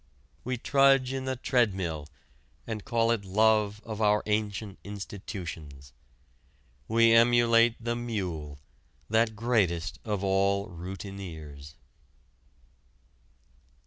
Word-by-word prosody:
We 125 0 -2
trudge 135 0 +3
in 135 -1 -3
the 130 0 -1
treadmill 95 - 0 0.6
and 110 -3 -5
call 115 0 +1
it 115 -3 0
love 105 +1 +2
of 110 -1 -5
our 105 0 +3
ancient 105 -1 -2
institutions. 85 - -8 0.9
We 115 +1 +4
emulate 115 0 +5
the 120 +1 -2
mule, 90 -11 -4 0.5
that 110 0 +2
greatest 100 -6 0
of 105 -3 -2
all 100 +1 +1
routineers. 85 -6 -8
105 Hz, 95 wpm, -28 LUFS, 95-115 Hz, 0.9 s, emulate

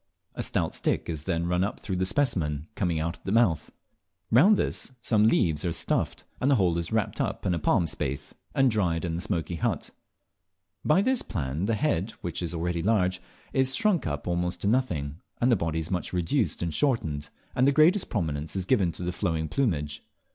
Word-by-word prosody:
A - - -4
stout - - -1
stick - - 0
is 80 -2 -4
then 85 -2 0
run 90 +1 +1
up 100 - -3
through 95 -3 -3
the 95 0 +1
specimen 85 - 0
coming 85 -5 0
out 85 +2 -3
at - - -35
the 95 - -3
mouth. 100 -9 +2 0.6
Round 185 - +6
this 130 - -2
some 110 -3 +3
leaves 80 -8 +2
are 85 - 0
stuffed, 85 - -1 0.2
and 135 - +2
the 140 - +5
whole 90 -6 +2
is 85 - -4
wrapped 110 -2 0
up - - -3
in 95 - +2
a 85 - -1
palm 85 - +2
spathe 70 -3 -3 0.2
and 135 -2 +4
dried 90 -6 0
in 85 - -2
the 85 - -3
smoky 85 -3 -2
hut. - - -1 0.9
By 170 +6 +4
this 255 +1 +3
plan 75 -2 -3
the 115 - +2
head, 110 - 0
which 85 -1 -3
is 85 -1 -3
really 85 0 -1
large, 95 -2 +1 0.3
is 130 0 +2
shrunk 210 - +2
up 75 +1 -4
almost 90 0 -1
to - - 0
nothing, 85 - 0 0.2
the 120 0 +4
body 80 -4 -2
is 80 +2 -3
much 90 -1 -2
reduced 85 -1 0
and 85 -2 -2
shortened, 90 - 0 0.3
and 130 +2 +4
the - - +6
greatest 165 +7 +4
prominence 80 -6 -2
is 95 -2 -1
given 95 -7 +2
to - - -6
the 90 - -1
flowing 80 -4 -1
plumage. 75 - -1
90 Hz, 205 wpm, -27 LUFS, 80-115 Hz, 0.9 s, Round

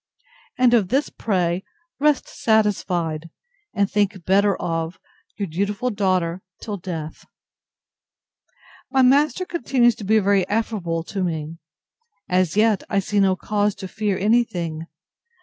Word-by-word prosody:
And 250 -1 +4
of 220 -6 +4
this 270 +9 0
pray 180 -3 -1 0.4
rest 295 -1 +2
satisfied, 180 -7 0 0.4
and 200 -1 +1
think 200 -3 -1
better 200 +1 +3
of 165 0 -3 0.4
Your 205 - -1
dutiful 200 +8 -2
DAUGHTER 185 -4 0 0.2
till 210 -2 -5
death. 165 -4 -6 1.6
My 265 -1 +3
master 285 +6 +3
continues 255 -8 +2
to - - -8
be 215 +3 +3
very 200 -2 +2
affable 205 -7 -1
to 195 +2 -4
me. 160 -1 -4 0.7
As 180 0 +1
yet 215 -2 +3
I 200 - 0
see 200 +1 0
no 190 -1 +3
cause 205 +2 0
to 195 -1 -7
fear 205 0 -2
any 225 +5 +3
thing. 165 -7 -5
200 Hz, 130 wpm, -22 LUFS, 175-220 Hz, 1.6 s, And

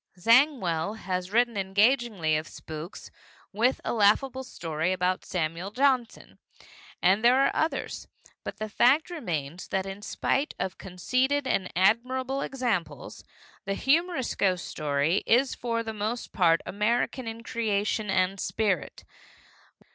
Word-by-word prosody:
Zangwill 220 - +3
has 185 -2 -3
written 235 +1 +2
engagingly 200 - +2
of 155 0 -2
spooks, 160 +3 -9 0.4
with 235 +6 +2
a - - -1
laughable 240 +5 +2
story 165 -7 -3
about 185 0 0
Samuel 170 +1 -3
Johnson. 255 0 0 0.6
And 195 +5 +4
there 245 +2 +6
are 275 - +3
others. 320 - -2 0.4
But - - -6
the 215 - -4
fact 265 +10 +3
remains 175 - -4
that 190 -1 -1
in 195 +1 -7
spite 275 +7 -1
of 190 - -4
conceded 255 +10 0
and 190 -7 -1
admirable 255 +8 +1
examples, 205 - -3 0.4
the 195 0 -1
humorous 315 - +1
ghost 185 -3 0
story 150 +4 0
is 255 +4 +3
for 230 -1 -2
the 220 -1 -5
most 215 +3 -3
part 165 -3 +3
American 230 +4 -1
in 225 +1 -6
creation 210 -2 -1
and 190 0 +1
spirit. 200 -6 -1
210 Hz, 130 wpm, -27 LUFS, 180-250 Hz, 0.6 s, there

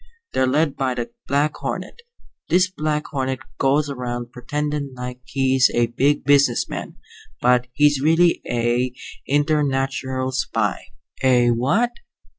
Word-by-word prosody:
They're 130 - +2
led 145 +2 +1
by 130 -2 -1
the 120 -1 -4 0.2
Black 145 +2 +1
Hornet. 470 - -5 0.5
This 180 +1 +4
Black 150 -3 -2
Hornet 130 -1 -1 0.2
goes 140 +2 +2
around 120 -3 -5
pretendin' 145 +2 -3
like 125 0 -7
he's 130 -1 +3
a 120 0 +1
big 145 +3 +2
business 140 -4 +3
man, - - -6 0.4
but 125 0 +3
he's 145 -1 +3
really 165 +3 +3
a 120 +1 0 0.3
internatural 135 -3 0
spy." 115 -5 -1 0.4
"A 125 -2 +4
what?" 140 - +1
135 Hz, 125 wpm, -22 LUFS, 125-145 Hz, 0.5 s, This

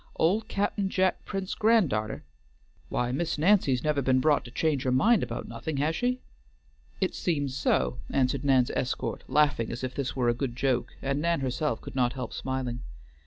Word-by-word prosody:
"Old 210 +7 +2
Cap'n 200 0 -1
Jack 185 -1 +1
Prince's 195 -2 -3
grand 220 - +3
darter? 110 +1 -2 0.7
Why 125 0 -1
Miss 160 +5 -1
Nancy's 150 - +3
never 150 -2 +1
been 130 0 +3
brought 145 +2 +3
to - - -8
change 145 +2 0
her 130 -2 0
mind 210 - +4
about 120 -1 -4
nothing, 135 +6 -5
has 150 +4 +1
she?" 250 +4 0 0.8
"It 190 - 0
seems 145 -6 -1
so," 65 - +1
answered 135 0 +1
Nan's 130 -3 +3
escort, 125 - -2
laughing 145 -4 +2
as 120 +2 -5
if 130 -1 -3
this 140 -2 -3
were 125 -2 +1
a 120 - +4
good 120 0 -3
joke; 130 -1 0
and 140 +1 0
Nan 170 -2 +1
herself 130 -1 -1
could - - -9
not 125 -1 +2
help 125 -3 -5
smiling. 130 -2 -3
135 Hz, 185 wpm, -28 LUFS, 125-165 Hz, 0.8 s, mind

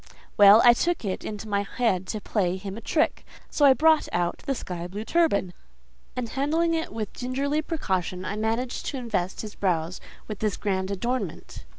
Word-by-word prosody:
Well, 205 +2 +8
I 240 - +9
took 340 +1 -1
it 190 - -3
into 210 0 -6
my 200 -1 +1
head 195 -3 -1
to 215 - -3
play 190 -3 -1
him 195 0 -7
a 230 - -8
trick: 310 +7 0 0.3
so 290 - +3
I 270 - +8
brought 315 +1 +4
out 175 0 -1
the 275 - +1
sky 175 -6 -5
blue 205 +4 -6
turban, 265 - +1 0.6
and 250 -2 -3
handling 320 +6 +1
it 325 0 -2
with 215 -2 -5
gingerly 275 +4 -1
precaution, 185 - -2
I 200 - -3
managed 225 +3 -2
to 275 - -3
invest 210 -7 -2
his 215 -2 -7
brows 175 -2 -1 0.3
with 210 -2 -6
this 215 -3 -1
grand 190 -2 -1
adornment. 200 - -4
215 Hz, 185 wpm, -26 LUFS, 190-260 Hz, 0.6 s, I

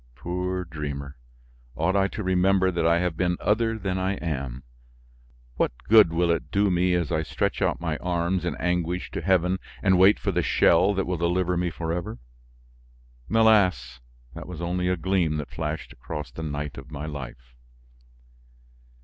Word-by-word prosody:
Poor 90 +6 -3
dreamer! 70 -3 -6 0.6
Ought 85 +5 0
I 100 -1 +3
to 100 +3 -6
remember 95 0 +3
that 85 -2 0
I 85 0 +4
have 90 -2 -1
been 90 +1 0
other 115 +1 +1
than 95 -3 -2
I 95 +1 0
am? 65 -7 -4 0.9
What - - +1
good 110 -6 +7
will 85 +1 +2
it 85 - -2
do 100 0 +2
me 90 0 +2
as 85 -3 -1
I 80 -2 +1
stretch 80 - -2
out - - +1
my 80 -3 -2
arms 90 0 -1
in 90 - -2
anguish 90 0 -2
to - - -4
heaven 95 0 +2 0.2
and 95 -3 +4
wait 95 +3 +6
for - - -2
the - - +1
shell 95 +4 +3
that 95 - 0
will 90 -1 -2
deliver 90 +2 0
me 90 0 0
forever. 85 +6 -4 1.1
Alas! 95 - +3 0.3
that - - -9
was 90 -3 -8
only 90 +1 -1
a 90 0 +1
gleam 85 -3 0
that 75 - -6
flashed 80 0 -4
across 75 +3 -7
the - - -8
night 75 -3 -4
of 70 - -13
my 75 -1 -6
life. 65 -4 -8
90 Hz, 170 wpm, -25 LUFS, 80-95 Hz, 1.1 s, good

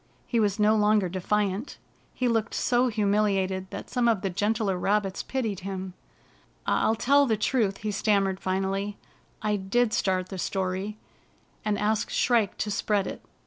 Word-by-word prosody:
He 235 - 0
was 205 -2 +1
no 210 +1 +4
longer 210 -2 +3
defiant. 200 +5 -1 0.3
He 250 - -1
looked 225 -2 0
so 250 +1 +2
humiliated 200 -3 +1
that - - -7
some 245 -2 +2
of 225 -5 +2
the 195 - -2
gentler 205 +1 0
rabbits 195 +1 0
pitied 225 -8 -2
him. 190 -1 -5 0.4
" - - -34
I'll 220 - +2
tell 280 +5 +4
the 220 -2 +1
truth," 215 -3 +1
he 210 - 0
stammered 195 -2 +1
finally. 195 +2 -2 0.2
" - - -36
I 210 -1 +1
did 215 +4 +1
start 185 -1 0
the 190 - -6
story, 190 +3 -2 0.7
and 210 -1 0
ask 215 +1 0
Shrike 230 -6 +2
to 210 - -2
spread 200 -1 +1
it. - - -6
205 Hz, 165 wpm, -27 LUFS, 190-220 Hz, 0.7 s, no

